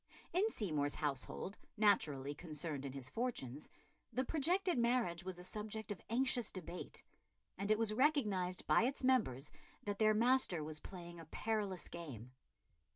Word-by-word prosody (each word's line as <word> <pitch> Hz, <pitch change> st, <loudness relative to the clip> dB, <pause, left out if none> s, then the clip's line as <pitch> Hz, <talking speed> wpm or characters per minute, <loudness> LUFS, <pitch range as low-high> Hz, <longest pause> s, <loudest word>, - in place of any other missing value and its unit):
In 390 Hz, +5 st, +3 dB
Seymour's 150 Hz, -, 0 dB
household, 150 Hz, +6 st, -3 dB, 0.2 s
naturally 150 Hz, -10 st, +3 dB
concerned 150 Hz, -2 st, -4 dB
in -, -, -5 dB
his 135 Hz, -2 st, -3 dB
fortunes, 150 Hz, -, -3 dB, 0.4 s
the 255 Hz, -, +1 dB
projected 340 Hz, +3 st, +2 dB
marriage 235 Hz, -8 st, +2 dB
was 185 Hz, -1 st, -5 dB
a 180 Hz, -, -8 dB
subject 215 Hz, +3 st, -4 dB
of 205 Hz, -, -5 dB
anxious 245 Hz, -1 st, +2 dB
debate; 180 Hz, -1 st, -7 dB, 0.5 s
and 200 Hz, +1 st, -2 dB
it 215 Hz, -, +5 dB
was 220 Hz, -1 st, +1 dB
recognised 215 Hz, -10 st, +2 dB
by -, -, +5 dB
its 270 Hz, +2 st, -1 dB
members 155 Hz, -, +2 dB, 0.3 s
that 205 Hz, -1 st, -3 dB
their 215 Hz, -1 st, +5 dB
master 235 Hz, -8 st, +4 dB
was 155 Hz, 0 st, -4 dB
playing 175 Hz, 0 st, -8 dB
a 165 Hz, -, -9 dB
perilous 205 Hz, +1 st, -2 dB
game. 130 Hz, -9 st, -7 dB
195 Hz, 150 wpm, -38 LUFS, 155-235 Hz, 0.5 s, it